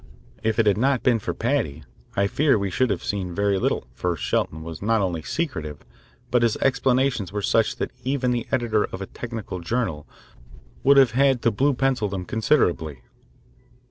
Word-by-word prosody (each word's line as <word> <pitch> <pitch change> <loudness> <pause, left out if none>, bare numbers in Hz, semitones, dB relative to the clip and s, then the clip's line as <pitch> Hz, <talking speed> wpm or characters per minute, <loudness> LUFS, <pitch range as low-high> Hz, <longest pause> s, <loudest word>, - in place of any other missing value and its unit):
If 110 -1 0
it 115 - +3
had 105 0 +3
not 135 0 +2
been 120 -3 +3
for 105 - -3
Paddy, 110 - -1 0.3
I 100 - +2
fear 140 +6 +2
we 100 -2 -2
should 130 +6 +1
have - - -2
seen 95 -4 -3
very 100 -1 +1
little, - - 0
for 90 -2 -2
Shelton 80 +1 -1
was 80 -1 -8
not 115 +2 +2
only 90 -5 -1
secretive, 80 - -4 0.5
but 125 - +3
his 115 -2 +2
explanations 130 -6 +1
were 105 0 -3
such 110 +1 +2
that - - -3
even 130 -1 0
the 120 -1 -2
editor 115 -4 +1
of 95 - -7
a - - -11
technical 115 -6 -6
journal 85 -5 -2 0.7
would 140 +1 +5
have 135 -4 +6
had 135 0 +2
to 115 - +4
blue 135 +6 +1
pencil 130 -5 +1
them 95 -2 -4
considerably. 85 - 0
110 Hz, 180 wpm, -24 LUFS, 95-130 Hz, 0.7 s, have